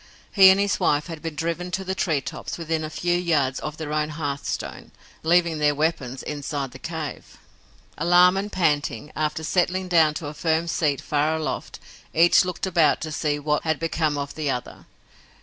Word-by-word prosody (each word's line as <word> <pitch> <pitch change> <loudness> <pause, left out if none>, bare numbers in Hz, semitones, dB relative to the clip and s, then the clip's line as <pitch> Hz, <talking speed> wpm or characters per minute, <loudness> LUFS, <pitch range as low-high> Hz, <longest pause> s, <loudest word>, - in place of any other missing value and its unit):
He 190 -2 +8
and 190 +1 +5
his 200 0 +1
wife 145 0 +2
had 165 -3 -8
been 165 -2 -5
driven 170 +3 -3
to 190 - -6
the 190 0 -2
treetops 155 -8 -2
within 160 -1 -2
a 155 - -4
few 175 +2 0
yards 155 -7 +1
of 150 +1 -6
their 150 -2 -5
own 150 0 0
hearthstone, 145 -2 -4 0.3
leaving 170 -1 +2
their 150 -1 +2
weapons 140 -4 -1
inside 145 -2 -4
their 130 - -11
cave! 160 -2 -6 0.6
Alarmed 180 +3 +5
and 205 +1 -4
panting, 150 -6 0
after 155 +1 -2
settling 185 +3 0
down 160 -3 +4
to 150 - -5
a 145 - -5
firm 160 +2 0
seat 150 -4 0
far 150 +2 0
aloft, 160 -1 -4 0.4
each 170 +4 +6
looked 180 0 -3
about 165 -6 +3
to 155 - -4
see 150 -1 -1
what 150 0 0
had 160 -2 -1
become 155 -2 0
of 140 0 -4
the 155 -2 -3
other. 125 -2 -5
155 Hz, 185 wpm, -24 LUFS, 150-170 Hz, 0.6 s, He